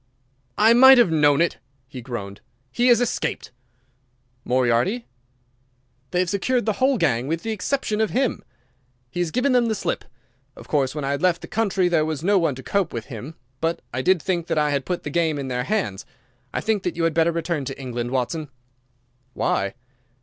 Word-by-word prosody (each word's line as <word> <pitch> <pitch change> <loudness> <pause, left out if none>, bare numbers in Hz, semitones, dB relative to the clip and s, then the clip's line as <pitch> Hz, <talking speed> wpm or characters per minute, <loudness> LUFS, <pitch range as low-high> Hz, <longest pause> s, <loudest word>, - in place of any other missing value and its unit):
"I 220 +2 +6
might 265 +2 +9
have 235 -8 +5
known 150 -1 +4
it!" 170 - 0 0.3
he 130 -2 -9
groaned. 100 -5 -7 0.3
"He 240 - +1
has 240 -2 +6
escaped!" 245 - -2 0.9
"Moriarty?" 130 - +1 1.0
"They 180 - -2
have 180 - -1
secured 240 +4 0
the 215 - +1
whole 265 0 +3
gang 135 - +1
with 165 +2 -2
the 225 - -2
exception 220 +1 -1
of 220 - +1
him. 260 -1 -1 0.7
He 175 - -5
has 175 -2 0
given 255 - +1
them 245 -2 +3
the 220 - 0
slip. 195 - -2 0.5
Of - - -13
course, 140 -2 0
when 150 -2 -3
I 135 - -1
had 140 +1 -2
left 180 -2 +1
the - - -7
country 200 -4 +1
there 170 -3 +2
was 155 -1 -3
no 200 +2 +3
one 165 -6 0
to 130 - -10
cope 200 -4 0
with 115 -2 -4
him. 125 +8 -8 0.2
But 165 +2 -2
I 130 - -1
did 185 +6 +3
think 170 0 -2
that - - -1
I 150 -1 +2
had 140 -2 -1
put 180 -1 -3
the 150 - -5
game 160 -2 +1
in 135 -2 -4
their 125 -1 -2
hands. 195 - -2 0.5
I - - -2
think 220 -3 0
that 180 -2 -3
you 170 - -2
had 165 -1 +2
better 165 +1 +3
return 165 -2 -2
to 135 +1 -6
England, 120 -2 -4
Watson." 135 +4 -2 0.9
"Why?" 100 +2 0
165 Hz, 200 wpm, -23 LUFS, 135-205 Hz, 1.0 s, might